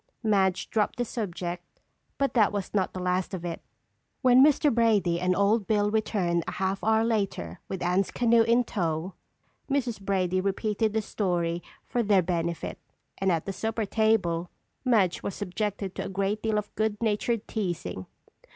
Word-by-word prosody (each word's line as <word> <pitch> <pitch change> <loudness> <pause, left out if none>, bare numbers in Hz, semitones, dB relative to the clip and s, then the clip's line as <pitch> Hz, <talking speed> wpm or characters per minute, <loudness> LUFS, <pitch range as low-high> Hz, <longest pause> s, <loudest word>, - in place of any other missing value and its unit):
Madge 195 -4 +2
dropped 215 -2 +1
the 245 - -1
subject 175 -6 -5 0.4
but 275 0 0
that 220 -4 +4
was 200 -2 -4
not 195 -3 +1
the 185 - -6
last 180 +1 -1
of 175 -1 -6
it. 170 -1 -4 0.6
When 255 +1 +7
Mr. 295 -1 +4
Brady 210 -7 +3
and 180 +1 +1
Old 200 +2 +2
Bill 210 -1 +2
returned 185 -6 0
a - - -3
half 190 +1 -2
hour 220 0 +3
later 195 - -1
with 190 -2 -4
Anne's 180 +2 +1
canoe 235 -1 +3
in 235 +2 +4
tow, 170 -4 -2 0.6
Mrs. 250 -6 -1
Brady 185 -2 0
repeated 210 +2 0
the 220 -1 0
story 175 -5 -1 0.2
for 245 - -1
their 200 -4 +3
benefit 170 -1 -2 0.4
and 195 -1 +2
at 165 -2 0
the 195 - -3
supper 220 +2 -2
table 190 -6 +1 0.3
Madge 215 -9 +2
was 200 - -4
subjected 200 0 -3
to - - -4
a - - -4
great 195 +2 -1
deal 220 -1 0
of 210 0 -4
goodnatured 220 +1 0
teasing. 165 - -3
200 Hz, 165 wpm, -27 LUFS, 180-220 Hz, 0.6 s, When